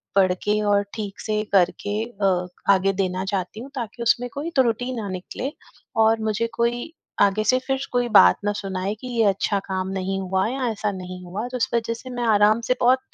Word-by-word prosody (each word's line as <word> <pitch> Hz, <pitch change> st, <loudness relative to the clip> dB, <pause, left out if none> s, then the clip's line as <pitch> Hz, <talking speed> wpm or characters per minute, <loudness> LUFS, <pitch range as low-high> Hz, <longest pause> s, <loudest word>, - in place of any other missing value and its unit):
पढ़ 185 Hz, -2 st, +4 dB
के 210 Hz, +1 st, +2 dB
और 200 Hz, 0 st, +3 dB
ठीक 205 Hz, -3 st, -5 dB
से 215 Hz, -1 st, -1 dB
करके 205 Hz, +3 st, +2 dB
अ, 195 Hz, -5 st, 0 dB, 0.3 s
आगे 195 Hz, +1 st, +2 dB
देना 185 Hz, 0 st, -1 dB
चाहती 190 Hz, +2 st, -3 dB
हूँ, 265 Hz, +4 st, -8 dB
ताकि 235 Hz, -1 st, -5 dB
उसमें 245 Hz, +1 st, +2 dB
कोई 295 Hz, +4 st, -4 dB
त्रुटि 250 Hz, 0 st, +1 dB
ना 200 Hz, -, -5 dB
निकले 185 Hz, +9 st, -5 dB, 0.5 s
और 225 Hz, 0 st, +3 dB
मुझे 225 Hz, +2 st, 0 dB
कोई 240 Hz, +6 st, -1 dB, 0.3 s
आगे 205 Hz, +1 st, +3 dB
से 255 Hz, -, +4 dB
फिर 270 Hz, 0 st, 0 dB
कोई 245 Hz, -1 st, +1 dB
बात -, -, +8 dB
ना 205 Hz, -, +2 dB
सुनाए 195 Hz, 0 st, -3 dB
कि, 255 Hz, -, -6 dB
"ये -, -, +5 dB
अच्छा 200 Hz, 0 st, +1 dB
काम 190 Hz, -1 st, -2 dB
नहीं 195 Hz, +1 st, -2 dB
हुआ 190 Hz, +2 st, 0 dB
या 260 Hz, +1 st, -2 dB
ऐसा 210 Hz, -1 st, -2 dB
नहीं 185 Hz, -1 st, -7 dB
हुआ।" 205 Hz, +7 st, -4 dB
तो 250 Hz, -, -4 dB
इस 230 Hz, -, 0 dB
वज़ह 230 Hz, 0 st, 0 dB
से 255 Hz, +2 st, -10 dB
मैं 245 Hz, -1 st, -3 dB
आराम 215 Hz, +1 st, +4 dB
से 255 Hz, -, +4 dB
बहुत, 255 Hz, +2 st, +5 dB
210 Hz, 205 wpm, -23 LUFS, 195-240 Hz, 0.5 s, बात